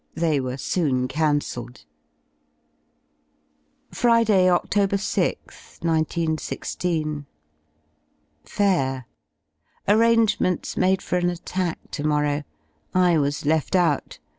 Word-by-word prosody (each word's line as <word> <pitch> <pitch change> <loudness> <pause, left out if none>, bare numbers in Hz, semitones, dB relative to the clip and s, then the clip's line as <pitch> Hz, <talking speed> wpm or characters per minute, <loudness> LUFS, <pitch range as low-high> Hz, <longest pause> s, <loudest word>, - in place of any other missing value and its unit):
They 160 -3 +1
were 130 0 -3
soon 135 -5 0
cancelled. 145 -5 -2 2.1
Friday, 230 -6 +3
Oct. 175 -1 +2
6th, 200 -3 -2
191 160 -1 0
6. - - -6 1.7
Fair! 135 - 0 0.8
Arrangements 220 -4 +2
made 190 +1 +2
for 180 - -1
an 175 0 +1
attack 175 0 -4
to 145 - -4
morrow. 150 -1 +1 0.5
I 180 -3 +4
was 145 0 -1
left 155 +4 +1
out. 170 -6 +1
165 Hz, 90 wpm, -23 LUFS, 145-190 Hz, 2.1 s, I